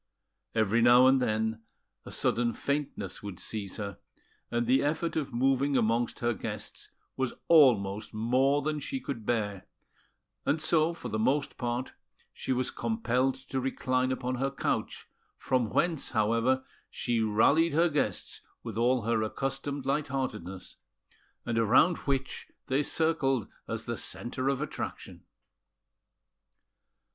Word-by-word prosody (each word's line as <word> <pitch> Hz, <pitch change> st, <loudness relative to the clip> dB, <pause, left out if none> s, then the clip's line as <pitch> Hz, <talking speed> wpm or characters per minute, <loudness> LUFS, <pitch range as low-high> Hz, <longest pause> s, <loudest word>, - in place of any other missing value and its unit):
Every 110 Hz, +1 st, +3 dB
now 120 Hz, +2 st, +7 dB
and 130 Hz, 0 st, +5 dB
then 110 Hz, -1 st, 0 dB, 0.5 s
a -, -, -7 dB
sudden 120 Hz, 0 st, +1 dB
faintness 140 Hz, -9 st, -3 dB
would 100 Hz, -4 st, -7 dB
seize 100 Hz, -4 st, -4 dB
her, 100 Hz, -2 st, -5 dB, 0.5 s
and 120 Hz, 0 st, 0 dB
the 130 Hz, +3 st, +4 dB
effort 160 Hz, +3 st, -1 dB
of 145 Hz, -4 st, -2 dB
moving 135 Hz, +3 st, +2 dB
amongst 115 Hz, +2 st, +1 dB
her 120 Hz, 0 st, +2 dB
guests 105 Hz, -, -6 dB, 0.3 s
was 130 Hz, -2 st, -2 dB
almost 110 Hz, -10 st, +4 dB
more 130 Hz, +6 st, +2 dB
than 155 Hz, 0 st, -1 dB
she 265 Hz, -, -4 dB
could 125 Hz, -, -6 dB
bear; 105 Hz, -5 st, -1 dB, 0.8 s
and 150 Hz, -, +1 dB
so, 160 Hz, +1 st, +3 dB
for 170 Hz, -7 st, -7 dB
the 110 Hz, 0 st, -2 dB
most 140 Hz, +5 st, +1 dB
part, 120 Hz, +1 st, -3 dB, 0.4 s
she -, -, -4 dB
was 130 Hz, 0 st, 0 dB
compelled 135 Hz, -, 0 dB
to 130 Hz, 0 st, -4 dB
recline 130 Hz, 0 st, 0 dB
upon 130 Hz, 0 st, -2 dB
her 135 Hz, +2 st, 0 dB
couch, 135 Hz, -, -2 dB, 0.3 s
from 125 Hz, -4 st, 0 dB
whence, 165 Hz, +2 st, 0 dB
however 115 Hz, +3 st, +2 dB, 0.3 s
she 120 Hz, -1 st, -1 dB
rallied 140 Hz, +10 st, +3 dB
her 165 Hz, +3 st, +4 dB
guests 150 Hz, -3 st, -2 dB, 0.2 s
with 115 Hz, -2 st, -5 dB
all 125 Hz, 0 st, +3 dB
her 115 Hz, 0 st, +1 dB
accustomed 135 Hz, +5 st, -3 dB
light 140 Hz, +2 st, 0 dB
heartedness, 105 Hz, -9 st, -4 dB, 0.7 s
and 115 Hz, -1 st, 0 dB
around 130 Hz, -, +4 dB
which 135 Hz, -1 st, -1 dB, 0.2 s
they 135 Hz, +2 st, +1 dB
circled 145 Hz, -7 st, +1 dB, 0.2 s
as -, -, -3 dB
the -, -, -4 dB
centre 130 Hz, +2 st, -3 dB
of 140 Hz, +1 st, 0 dB
attraction. -, -, -6 dB
130 Hz, 135 wpm, -29 LUFS, 115-140 Hz, 0.8 s, now